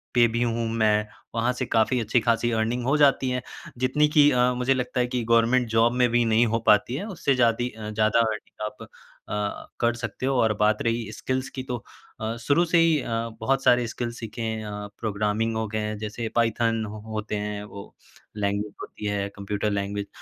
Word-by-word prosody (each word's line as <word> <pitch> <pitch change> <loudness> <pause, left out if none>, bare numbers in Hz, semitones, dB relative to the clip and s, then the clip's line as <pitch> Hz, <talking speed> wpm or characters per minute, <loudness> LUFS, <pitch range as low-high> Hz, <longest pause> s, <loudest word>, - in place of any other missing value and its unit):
पे 120 -1 +6
भी 115 - -1
हूँ 115 -1 -1
मैं, 105 -2 +2 0.3
वहाँ 115 +2 +2
से 130 +1 -3
काफ़ी 115 +2 +2
अच्छी 115 +2 +2
खासी 115 +1 +1
अर्निंग 115 +2 0
हो 135 +3 +2
जाती 135 -3 +4
है। 125 0 -1 0.4
जितनी 130 +4 +3
की 150 -1 +6
अ, 125 0 +3
मुझे 125 +2 +2
लगता 125 -1 -2
है 125 - +2
कि 125 -1 -2
गवर्नमेंट 115 +2 +4
जॉब 115 +2 +3
में 125 0 +3
भी 120 0 +3
नहीं 115 +1 +4
हो 115 +1 0
पाती 105 +4 +4
है, 175 - -3
उससे 160 -9 0
जादी 120 0 +2
अ, 110 -2 -8
ज़्यादा 110 +1 +2
अर्निंग 110 -1 -2
आप 105 0 -8 0.4
अ, 105 -1 -3
कर 120 -1 +2
सकते 115 +1 -5
हो 135 - +1
और 110 -1 +3
बात 105 0 +2
रही 115 -1 -1
स्किल्स 130 +3 -3
की 130 - -6
तो 125 -1 -3 0.4
अ, 110 +1 -2
शुरू 145 +8 +3
से 170 +1 +2
ही 165 -2 +4
अ, - - -7 0.3
बहुत 135 0 +1
सारे 120 -2 +4
स्किल 120 +1 -4
सीखे 115 +1 -6
हैं 110 -1 -3
अ, 105 0 -6
प्रोग्रामिंग 110 +1 -1
हो 110 0 -1
गए 110 +1 -2
हैं। 105 0 -3
जैसे 110 +1 -4
पायथन 115 -1 +1
हो 105 +1 -8
होते 110 0 -3
हैं 105 0 -4
वो, 100 -1 -11 0.4
लैंग्वेज 100 0 -1
होती 105 - -8
है, 100 -1 -1
कंप्यूटर 105 +1 -2
लैंग्वेज 100 0 -2
115 Hz, 210 wpm, -25 LUFS, 105-125 Hz, 0.4 s, पे